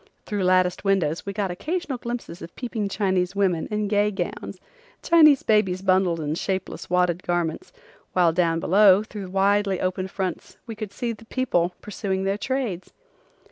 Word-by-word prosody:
Through 205 -3 -2
latticed 185 0 +2
windows 190 -4 0
we - - -1
got 200 -2 -2
occasional 305 - -3
glimpses 235 -8 -6
of 170 - -10
peeping 225 -5 -3
Chinese 190 -2 0
women 185 -5 +1
in 210 -1 -1
gay 205 0 +2
gowns, 190 -4 -5 0.4
Chinese 305 -5 +6
babies 195 -4 +2
bundled 185 -3 +2
in 150 -1 -2
shapeless, 190 +3 -4
wadded 180 -1 +1
garments, 175 - -2 0.4
while 175 -3 +3
down 165 -1 +1
below 195 +3 +5
through 205 -3 -8
widely 195 0 +2
opened 185 +1 -2
fronts 190 -3 -5
we 230 - -6
could 215 -2 -6
see 235 +2 -3
people 220 -6 -1
pursuing 195 -2 -3
their 195 +1 -1
trades. 220 -7 -3
195 Hz, 155 wpm, -24 LUFS, 180-210 Hz, 0.4 s, Chinese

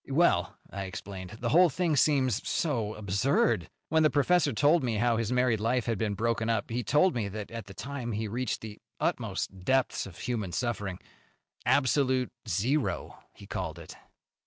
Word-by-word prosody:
"Well," 110 - +2
I 100 0 -4
explained, 95 +1 -7
"the 120 - 0
whole 175 +5 +6
thing 165 +1 0
seems 130 -5 +3
so 115 -10 -1
absurd. 100 - +1 0.2
When 160 +1 +3
the 155 - +5
professor 150 +2 +3
told 145 +8 +3
me 120 -3 0
how 115 +2 +2
his 115 0 -1
married 125 -3 +2
life 115 +2 +1
had 115 -4 -1
been 105 -2 0
broken 115 +1 0
up, 110 -1 -1
he 120 +1 -1
told 150 - +3
me 115 -4 -1
that 105 +2 -6
at 115 -3 -6
that 95 - -12
time 130 -3 -4
he 110 +1 -2
reached 120 +3 -2
the 110 -2 -8 0.2
utmost 95 -1 -2
depths 130 0 +1
of 95 - -12
human 110 -8 -3
suffering. 100 -5 -2 0.7
Absolute 130 -2 +2 0.2
zero, 100 - -1 0.2
he - - -12
called - - -4
it." - - -10
115 Hz, 175 wpm, -29 LUFS, 105-135 Hz, 0.7 s, whole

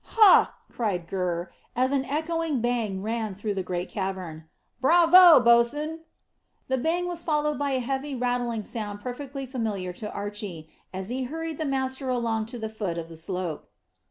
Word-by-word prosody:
"Hah!" 430 -4 +6 0.2
cried 200 -7 -2
Gurr, 175 -1 -2 0.2
as 255 +2 +2
an 270 -1 +1
echoing 320 0 -1
bang 225 -5 -1
ran 220 -2 -2
through 205 +1 -3
the 195 - -2
great 180 0 -3
cavern. 185 -5 -5 0.4
"Bravo, 345 +3 +8
bo's'n!" 245 +7 +3 0.7
The 260 0 +1
bang 345 +6 0
was 350 -1 -3
followed 300 -3 0
by 285 -1 0
a 260 - +1
heavy 270 +3 -3
rattling 245 -2 -1
sound 210 -2 -5
perfectly 270 +3 -6
familiar 215 -8 -3
to 210 +3 -6
Archy, 200 -6 -6 0.2
as 190 +1 -5
he 255 +1 -2
hurried 320 +3 -5
the 315 - -1
master 265 0 -1
along 230 -3 0
to 245 +1 -6
the 220 -1 -4
foot 210 -6 -4
of 165 -1 -5
the 165 - -10
slope. 170 -1 -4
235 Hz, 165 wpm, -26 LUFS, 195-280 Hz, 0.7 s, Bravo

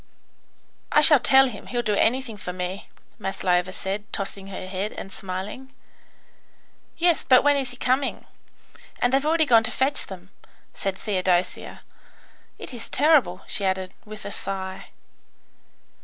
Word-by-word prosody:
"I 300 - +5
shall 300 -2 +9
tell 270 +1 +6
him. 220 -5 -9
He'll 240 -1 -2
do 215 - 0
anything 235 +2 +1
for 200 -3 -6
me," 180 +1 -5 0.3
Maslova 185 -2 0
said, 200 +3 -5
tossing 195 -1 -4
her 190 -1 -7
head, 190 +3 -4
and 195 - -8
smiling. 195 +8 -6 1.3
"Yes, 340 -1 +2
but 255 -1 +5
when 290 0 +4
is 270 -3 -2
he 250 - -11
coming? 260 +2 -1 0.7
and 245 +1 +1
they've 270 +1 +3
already 320 0 +3
gone 230 -5 +5
to 225 - +1
fetch 265 +4 0
them," 190 -1 -11 0.4
said 195 -1 -3
Theodosia. 185 -3 -1 0.8
"It - - -9
is 235 - -7
terrible," 275 - +3
she 200 - -1
added, 190 -1 -1
with 215 -2 -10
a 200 - -5
sigh. 190 -1 -4
205 Hz, 145 wpm, -24 LUFS, 190-260 Hz, 1.3 s, shall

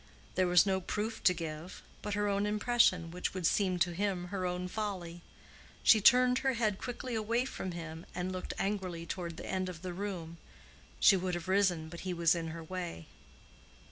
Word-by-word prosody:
There 185 0 +2
was 175 +1 +6
no 190 -1 +1
proof 215 +4 -3
to 190 - +8
give, 160 +1 -6 0.2
but 210 -1 -3
her 205 0 +1
own 200 0 +1
impression, 210 -5 +3
which 180 +2 -3
would 185 -2 -2
seem 185 +1 +2
to 175 0 +1
him 185 -1 -1
her 185 -2 -2
own 180 0 -2
folly. 180 -4 -4 0.6
She 220 - +7
turned 250 +3 +6
her 265 -1 +1
head 215 -5 0
quickly 250 0 -5
away 230 +3 0
from 190 -8 -5
him 165 -1 -7
and 180 +1 -2
looked 185 0 -5
angrily 185 -4 -2
toward 170 -1 -5
the - - -7
end 185 -1 -2
of 170 -1 -9
the 180 -1 -4
room: 175 -4 -5 0.6
she 200 - +7
would 185 -1 -1
have 175 +1 -5
risen, 185 -4 +2
but 170 +1 -9
he 185 -1 -3
was 170 -1 +4
in 170 -2 -3
her 165 +1 -6
way. 170 - -6
185 Hz, 195 wpm, -32 LUFS, 170-205 Hz, 0.6 s, to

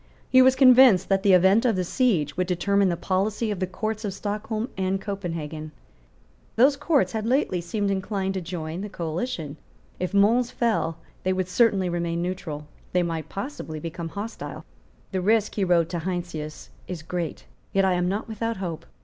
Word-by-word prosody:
He 260 - +8
was 260 0 +6
convinced 255 -7 +7
that 195 -1 +3
the 195 -1 +4
event 190 +5 +5
of 235 -4 +2
the 185 - 0
siege 175 - +1
would 185 0 0
determine 195 +2 +2
the 170 - -1
policy 200 +5 0
of 200 - -3
the 185 - -1
Courts 215 +3 -3
of 200 -3 -3
Stockholm 215 +2 -3
and 190 0 0
Copenhagen. 165 -6 -5 0.8
Those 270 +5 +5
Courts 290 0 +2
had 220 -1 -2
lately 245 -8 +1
seemed 200 +4 -1
inclined 195 0 -1
to 190 - -3
join 165 0 -5
the 210 - -5
coalition. 165 - -4 0.4
If 180 - -2
Mons 225 +5 +4
fell, 215 -9 0 0.2
they 185 - +1
would 185 -1 -1
certainly 195 -1 +3
remain 170 -1 -1
neutral; 170 -4 -4 0.3
they 180 0 +3
might 165 -2 -3
possibly 200 - -5
become 165 +1 -5
hostile. 210 +6 -6 0.5
"The 190 -2 -1
risk," 215 +2 +2
he 205 - 0
wrote 175 -3 +3
to 175 - -2
Heinsius, 170 -3 -5 0.2
"is 175 -4 -6
great; 170 -1 -4 0.3
yet 195 0 +3
I 190 - +3
am 180 0 +1
not 205 +3 -2
without 225 +1 -3
hope. 175 -4 -5
190 Hz, 180 wpm, -25 LUFS, 170-215 Hz, 0.8 s, He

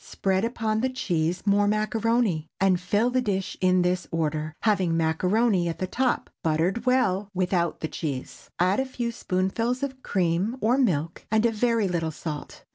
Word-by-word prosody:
Spread 190 0 -1
upon 220 -2 -1
the 260 - +1
cheese 175 -8 -1
more 205 0 +3
macaroni, 215 -5 +1
and 190 -2 +3
fill 210 +6 +1
the 255 0 +2
dish 195 -5 -2
in 185 -1 +4
this 180 0 0
order, 155 -1 -2
having 190 -6 +2
macaroni 180 +4 +2
at 165 - -4
the 185 - -2
top, 250 +7 0
buttered 170 +9 0
well, 210 -6 +2
without 180 -2 0
the 160 - -1
cheese. 140 -5 -6
Add 185 +5 +2
a 265 - +1
few 240 -2 -3
spoonfuls 230 +6 -1
of 265 -2 -4
cream 185 +5 0
or 245 +4 +2
milk, 170 - 0
and 220 +2 +2
a 235 - +3
very 225 -1 +1
little 170 -3 -1
salt. 150 -1 -7
190 Hz, 170 wpm, -26 LUFS, 170-230 Hz, -, in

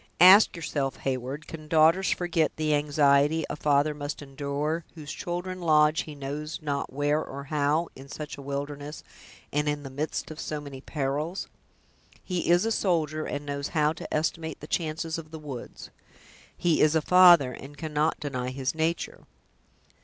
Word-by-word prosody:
Ask 185 +5 +8
yourself, 145 -4 -2
Heyward, 135 +3 -3
can 155 -2 -9
daughters 165 +4 +4
forget 170 -3 +1
the 155 -1 0
anxiety 145 +1 +3
a - - -3
father 150 0 +2
must 145 0 -5
endure, 145 +4 -3
whose 155 -2 -8
children 180 +1 -4
lodge 155 -2 +4
he 155 - -9
knows 145 +4 -5
not 145 -3 -3
where 145 +3 +1
or 140 +1 -7
how, 150 +3 +1
in 135 +1 -12
such 150 0 -6
a 140 - -10
wilderness, 145 +2 -5 0.5
and 150 +1 +1
in 145 0 -2
the 135 - -8
midst 150 +3 -3
of 155 - -9
so 150 - -3
many 140 -2 -9
perils?" 150 +6 -3 0.8
"He 180 -3 -2
is 175 +4 +5
a 225 - 0
soldier, 155 -7 0
and 145 0 -4
knows 140 0 -3
how 150 0 +3
to 160 - -9
estimate 160 0 -2
the - - -9
chances 160 +1 -2
of 155 -1 -10
the 160 - -8
woods." 145 -6 -8 0.7
"He 170 -2 +2
is 155 +1 +4
a 160 - +3
father, 175 -7 +7
and 145 +2 -11
cannot 155 +1 0
deny 130 -4 -3
his 130 0 -2
nature." 165 - -2
150 Hz, 170 wpm, -27 LUFS, 140-160 Hz, 0.8 s, Ask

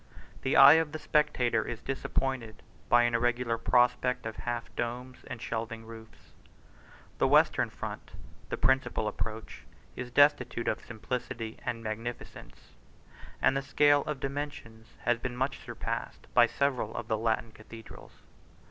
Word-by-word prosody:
The 130 - 0
eye 145 +4 +9
of 155 -2 -5
the - - -2
spectator 125 -7 +1
is 120 -1 -6
disappointed 130 -4 -3 0.3
by 120 0 +6
an 120 0 +1
irregular 120 0 +1
prospect 125 +1 +2
of 110 -1 -4
half 120 -1 -5
domes 125 +2 -4
and 125 - -6
shelving 115 0 -4
roofs: 110 -1 -13 0.9
the - - +4
western - - +4
front, - - -7 0.4
the - - -3
principal 130 -4 +1
approach, 110 +1 -5 0.3
is 125 -1 -5
destitute 130 -3 +3
of 110 - -1
simplicity 115 -1 -5
and 115 -2 -3
magnificence; 115 +2 -7 0.7
and - - +4
the 135 - +1
scale 145 +1 +4
of 150 -3 -3
dimensions 135 -6 -6
has 120 -1 +1
been 125 0 -5
much 130 +2 -1
surpassed - - -5
by - - +6
several 130 -6 -1
of 120 - -5
the 110 - 0
Latin 115 0 0
cathedrals. 115 +1 -13
120 Hz, 140 wpm, -30 LUFS, 115-130 Hz, 0.9 s, eye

